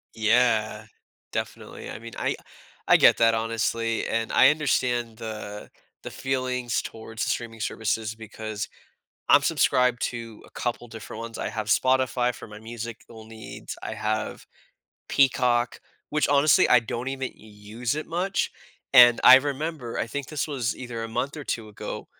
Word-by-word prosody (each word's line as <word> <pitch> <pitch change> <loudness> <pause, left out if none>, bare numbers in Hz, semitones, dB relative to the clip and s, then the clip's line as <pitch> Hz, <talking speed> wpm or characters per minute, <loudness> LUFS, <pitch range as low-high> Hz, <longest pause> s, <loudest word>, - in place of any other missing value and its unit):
Yeah. 110 -1 +2 0.5
Definitely. - - -5
I - - -6
mean, 115 +1 -10
I - - -1 0.5
I - - +7
get - - +6
that 115 -1 +4
honestly, 115 0 -1
and 115 0 -1
I - - +7
understand 120 -6 0
the 105 -2 -7 0.3
the - - -6
feelings 130 -2 -1
towards 110 0 -6
streaming 115 -2 -3
services 110 0 -2
because 110 -1 -6 0.6
I'm - - +7
subscribed 125 -6 +2
to 115 -2 -5
a - - -18
couple 120 0 -3
different 115 0 -8
ones. 115 0 -7
I - - -3
have 110 -2 -4
Spotify, 130 +1 +2
for 115 - -10
my 105 0 -11
musical 115 0 -9
needs. 110 -1 -9
I - - -4
have 110 0 -3 0.6
Peacock, 125 -3 +2 0.3
which 150 0 +1
honestly, 145 +2 +5
I 125 - +7
don't 120 +2 -4
even 135 -1 -4
use 110 +5 -5
it 155 - -4
much, 185 +4 -1 0.4
and 120 -3 +8
I 130 - +11
remember- 145 -2 -4
I - - -1
think 140 +3 -5
this 155 -2 -2
was 130 -6 -2
either 120 -3 -6
a 115 - -4
month 125 +6 -3
or 150 - -6
2 115 -4 -3
ago- 105 -1 -7
115 Hz, 155 wpm, -25 LUFS, 110-130 Hz, 0.6 s, I